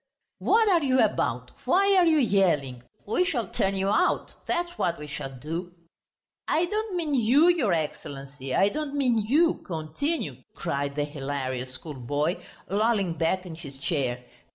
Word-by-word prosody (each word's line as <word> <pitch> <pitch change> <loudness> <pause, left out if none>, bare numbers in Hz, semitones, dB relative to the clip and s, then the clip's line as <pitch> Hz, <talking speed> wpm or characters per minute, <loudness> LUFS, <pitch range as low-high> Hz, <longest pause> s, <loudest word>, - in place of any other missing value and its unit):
"What 450 0 +3
are 355 -4 +4
you 260 -1 +3
about? - - +1
Why 395 +1 +4
are 360 -2 +5
you 320 -1 +4
yelling? 170 - +2 0.2
We 220 - +2
shall 255 - -1
turn 195 +2 0
you 195 +1 0
out, 205 - +1
that's 345 0 -1
what 170 - 0
we 150 - -7
shall 140 -2 -5
do." 165 +7 -6 0.7
"I 330 +3 +2
don't 425 +1 -2
mean 320 -4 -1
you, 270 +7 +5
your 305 - +2
Excellency, 140 -4 -4
I 195 - +4
don't 295 +2 -4
mean 250 -5 +2
you. 295 +11 +2
Continue!" 160 - -3 0.2
cried 140 0 -2
the 145 - 0
hilarious 135 -3 -4
schoolboy, 145 +3 -3 0.2
lolling 200 -2 +1
back 165 +4 0
in 175 - -7
his 145 -4 -9
chair. 130 -4 -1
185 Hz, 155 wpm, -26 LUFS, -, 0.7 s, are